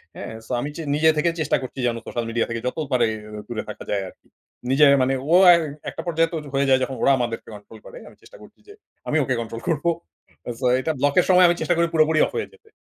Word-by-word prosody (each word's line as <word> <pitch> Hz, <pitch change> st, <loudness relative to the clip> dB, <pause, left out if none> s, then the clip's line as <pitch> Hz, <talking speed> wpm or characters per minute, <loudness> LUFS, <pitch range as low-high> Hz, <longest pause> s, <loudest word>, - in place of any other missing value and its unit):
হ্যাঁ? -, -, -7 dB
সো -, -, -11 dB
আমি 145 Hz, -, -4 dB
চে 165 Hz, -, -6 dB
নিজে 160 Hz, +1 st, +4 dB
থেকে 170 Hz, +3 st, +2 dB
চেষ্টা 150 Hz, -, +1 dB
করছি 130 Hz, +1 st, -8 dB
যেন, 115 Hz, -, -1 dB
সোশ্যাল 120 Hz, -1 st, -4 dB
মিডিয়া 115 Hz, 0 st, -1 dB
থেকে 115 Hz, 0 st, -3 dB
যত 125 Hz, -, -4 dB
পারি, 120 Hz, -3 st, +3 dB, 0.4 s
দূরে 115 Hz, -3 st, -4 dB
থাকা 105 Hz, -, -8 dB
যায় 100 Hz, -1 st, 0 dB
আরকি। -, -, -23 dB, 0.4 s
নিজে 140 Hz, +3 st, +5 dB, 0.2 s
মানে, 130 Hz, +1 st, +1 dB, 0.2 s
ও -, -, +4 dB, 0.6 s
একটা -, -, -7 dB
পর্যায়ে 165 Hz, 0 st, +1 dB
তো 165 Hz, -, -1 dB, 0.2 s
হয়ে 140 Hz, 0 st, +1 dB
যায় 130 Hz, 0 st, +5 dB
যখন, 130 Hz, 0 st, -4 dB
ওরা -, -, +4 dB
আমাদেরকে 120 Hz, -2 st, -4 dB
কন্ট্রোল 105 Hz, 0 st, -14 dB
করে। -, -, -11 dB
আমি -, -, -15 dB
চেষ্টা -, -, -16 dB
করছি -, -, -17 dB
যে, 410 Hz, -, -12 dB, 0.3 s
আমি 155 Hz, -, +1 dB
ওকে 130 Hz, -, -1 dB
কন্ট্রোল 115 Hz, 0 st, -7 dB
করব। 160 Hz, -1 st, -1 dB, 0.7 s
সো, 130 Hz, -, -3 dB
এটা 160 Hz, -, -1 dB
ব্লকের 145 Hz, +6 st, +3 dB
সময় 180 Hz, 0 st, +6 dB
আমি 175 Hz, -, +2 dB
চেষ্টা 175 Hz, -, +1 dB
করি 170 Hz, 0 st, +2 dB
পুরোপুরি 155 Hz, 0 st, +3 dB
অফ -, -, -6 dB
হয়ে 455 Hz, -, -2 dB
যেতে। 455 Hz, -1 st, -23 dB
140 Hz, 235 wpm, -22 LUFS, 120-165 Hz, 0.7 s, সময়